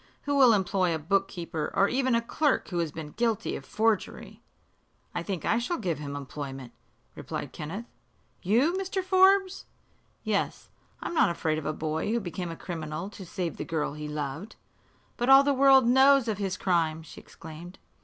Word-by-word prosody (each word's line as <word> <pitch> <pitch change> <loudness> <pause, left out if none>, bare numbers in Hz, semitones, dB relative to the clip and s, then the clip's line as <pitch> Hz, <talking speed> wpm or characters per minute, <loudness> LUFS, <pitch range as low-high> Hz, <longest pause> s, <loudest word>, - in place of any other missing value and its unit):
"Who 285 0 -1
will 260 -4 +7
employ 185 -3 +1
a - - -1
bookkeeper, 170 -1 -2
or 195 - +4
even 255 0 +1
a 230 - +1
clerk 290 +4 0
who 175 - -2
has 165 -3 -1
been 150 -1 -8
guilty 230 0 -1
of - - -7
forgery?" 215 +6 -1 0.7
"I 175 - -2
think 180 -2 -4
I 230 - +2
shall 295 +9 -2
give 175 -9 -2
him 145 -1 -6
employment," 135 -3 -7 0.4
replied - - -6
Kenneth. 190 +10 -6 0.6
"You, 240 - +2
Mr. 380 0 -2
Forbes!" 380 +1 +3 0.6
"Yes. - - -2 0.3
I'm - - -4
not 330 - +4
afraid 160 -2 -1
of 155 - -6
a - - +1
boy 155 +5 -2
who 235 - +1
became 180 -3 -5
a 165 - -6
criminal 165 +2 -5
to 200 - -10
save 175 -2 -4
the - - -4
girl 155 -3 -2
he 150 0 -6
loved." 150 +6 -5 0.6
"But 240 +2 -1
all 270 +1 +9
the 285 0 +2
world 270 -1 +6
knows 265 +1 +5
of 210 -2 -2
his 190 -2 -2
crime!" 165 -4 0
she 155 - -12
exclaimed. 165 +3 -11
190 Hz, 180 wpm, -27 LUFS, 160-245 Hz, 0.7 s, all